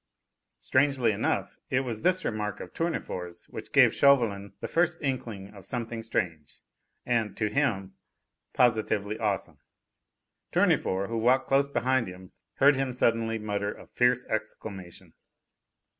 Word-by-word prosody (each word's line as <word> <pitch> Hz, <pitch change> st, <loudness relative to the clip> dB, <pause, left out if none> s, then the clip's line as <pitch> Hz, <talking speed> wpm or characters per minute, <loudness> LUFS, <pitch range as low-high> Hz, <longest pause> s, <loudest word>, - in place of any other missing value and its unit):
'" -, -, -56 dB
Strangely 130 Hz, -3 st, +2 dB
enough, 100 Hz, -, -1 dB
it 130 Hz, -, +2 dB
was 115 Hz, -5 st, -4 dB
this 185 Hz, 0 st, +2 dB
remark 105 Hz, -2 st, -2 dB
of -, -, -9 dB
Tournefort's 90 Hz, -, -4 dB
which -, -, -8 dB
gave -, -, +6 dB
Chauvelin 110 Hz, -8 st, +3 dB
the -, -, -4 dB
first 175 Hz, 0 st, +1 dB
inkling 115 Hz, -8 st, -4 dB
of 100 Hz, -2 st, -12 dB
something 115 Hz, +1 st, -4 dB
strange 85 Hz, -9 st, -3 dB, 0.5 s
and, 115 Hz, -4 st, 0 dB
to 105 Hz, -, 0 dB
him, 105 Hz, -8 st, 0 dB, 0.6 s
positively 110 Hz, -3 st, +1 dB
awesome. 105 Hz, -4 st, -2 dB, 0.9 s
Tournefort, 95 Hz, +2 st, +2 dB
who 115 Hz, 0 st, -1 dB
walked 130 Hz, +3 st, +3 dB
close 140 Hz, +1 st, +3 dB
beside 130 Hz, -3 st, +1 dB
him, 90 Hz, 0 st, -11 dB, 0.2 s
heard 140 Hz, +1 st, +5 dB
him 135 Hz, -1 st, -1 dB
suddenly 115 Hz, -2 st, +1 dB
mutter 105 Hz, -1 st, -2 dB
a -, -, -13 dB
fierce 125 Hz, 0 st, +2 dB
exclamation. 105 Hz, -4 st, -6 dB
115 Hz, 135 wpm, -28 LUFS, 100-130 Hz, 0.9 s, gave